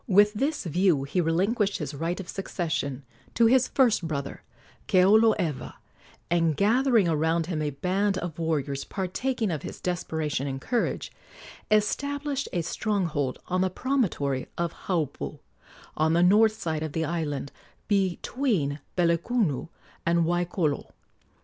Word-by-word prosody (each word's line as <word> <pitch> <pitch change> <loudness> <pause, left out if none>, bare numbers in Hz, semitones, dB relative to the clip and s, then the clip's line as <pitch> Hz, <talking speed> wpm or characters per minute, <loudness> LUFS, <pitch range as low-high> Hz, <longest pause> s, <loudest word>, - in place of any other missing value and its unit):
With 205 0 +5
this 280 +8 -1
view 175 -4 +2
he 160 +6 0
relinquished 195 +5 +1
his 150 -2 -5
right 165 +5 -2
of 190 - -6
succession 155 -8 -3 0.3
to 230 - +5
his 250 +2 +5
first 235 -10 +2
brother, 140 -3 -4 0.5
Keoloewa, 185 - +3 0.6
and, 165 -3 +2
gathering 230 -1 +3
around 160 +1 +1
him 165 -3 -2
a 150 - 0
band 190 +7 0
of 170 -3 -5
warriors 145 -4 -1
partaking 215 +3 -2
of 155 -4 -3
his - - -7
desperation 160 -5 -2
and 135 -1 -3
courage, 240 - -1 0.6
established 280 +6 0
a 175 -3 -1
stronghold 170 -7 -1
on 185 0 0
the 185 - +2
promontory 180 - -1
of 170 -1 -1
Haupu, 165 -7 -2 0.6
on 155 +1 +2
the 170 +1 +4
north 215 +4 +5
side 160 -2 -2
of 155 -2 -4
the 160 0 0
island, 145 -4 -3 0.4
between 195 - 0 0.2
Pelekunu 170 - +1 0.4
and 170 0 +2
Waikolo. 175 -3 -1
175 Hz, 130 wpm, -27 LUFS, 155-210 Hz, 0.6 s, With